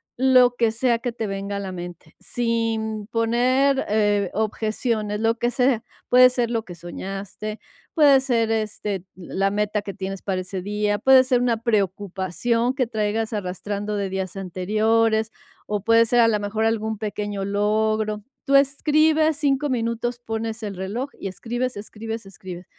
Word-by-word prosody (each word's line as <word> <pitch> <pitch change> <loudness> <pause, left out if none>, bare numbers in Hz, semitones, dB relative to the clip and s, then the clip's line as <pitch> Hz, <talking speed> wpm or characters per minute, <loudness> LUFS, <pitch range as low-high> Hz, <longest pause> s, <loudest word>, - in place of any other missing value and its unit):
lo 255 -1 +5
que 230 -2 +2
sea 235 +1 +1
que 245 +1 -3
te 225 -2 -4
venga 200 0 -4
a - - -3
la 190 -2 -5
mente. 175 -1 -9
Sin 225 -3 -1
poner, 250 +4 +2
eh, 205 -2 +2
objeciones, 215 0 -1
lo 225 +1 +2
que 240 +1 0
sea. 250 -2 +2 0.2
Puede 250 0 +7
ser 245 -2 -1
lo 230 -2 -1
que 180 -5 -10
soñaste, 195 +5 -6 0.3
puede 285 -4 +6
ser, 230 -4 +1
este, 210 -3 -2
la 190 +2 -1
meta 210 0 0
que 200 -1 -7
tienes 195 0 -5
para 185 -2 -2
ese 185 0 -5
día, 205 +1 -1
puede 260 +2 +6
ser 250 -1 +2
una 240 -2 +2
preocupación 205 +2 0
que 260 -3 0
traigas 220 0 -1
arrastrando 205 +1 -3
de 200 -1 -2
días 190 -1 -4
anteriores, 220 +4 +1 0.4
o 210 -2 -2
puede 230 +1 +5
ser 240 +1 +3
a 230 - +6
la 210 -2 +1
mejor 205 +2 -2
algún 220 -1 0
pequeño 205 -2 -3
logro. 215 +1 0 0.2
Tú 275 -1 +3
escribes 310 +3 +3
5 290 0 +1
minutos, 240 0 -2
pones 225 -1 -4
el 205 -2 -4
reloj 210 +9 -3
y - - -4
escribes, 240 +6 -3
escribes, 220 +1 -6
escribes. 185 -2 -9
220 Hz, 160 wpm, -23 LUFS, 205-240 Hz, 0.4 s, Puede